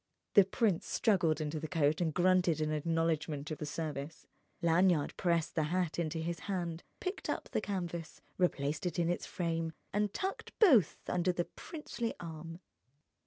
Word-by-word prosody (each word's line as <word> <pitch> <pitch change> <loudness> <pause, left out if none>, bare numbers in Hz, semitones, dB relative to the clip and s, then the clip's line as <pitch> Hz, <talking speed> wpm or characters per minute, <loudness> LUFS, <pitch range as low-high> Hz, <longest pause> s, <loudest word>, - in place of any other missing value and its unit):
The 200 -3 +8
prince 195 -2 +1
struggled 175 -8 +2
into 155 0 -2
the 155 - -4
coat 155 -1 +2
and 165 -2 +2
grunted 180 -1 +3
an 155 0 0
acknowledgment 155 -1 0
of 155 - -4
the 150 - -4
service. 150 0 -5 0.3
Lanyard 170 -2 +3
pressed 170 -3 +1
the 155 - +1
hat 175 +1 0
into 165 -1 -1
his 165 +1 -2
hand, 175 -3 -2 0.2
picked 370 +2 -4
up - - -2
the - - 0
canvas, 175 -5 -4 0.2
replaced 155 -1 +1
it 175 - -3
in 170 -1 +2
its 175 - -1
frame, 165 -2 -2 0.2
and 205 0 +1
tucked 390 - -4
both 265 - +5
under 180 0 +2
the 175 -1 -1
princely 265 -7 -5
arm. 165 +1 -7
170 Hz, 165 wpm, -33 LUFS, 155-185 Hz, 0.3 s, The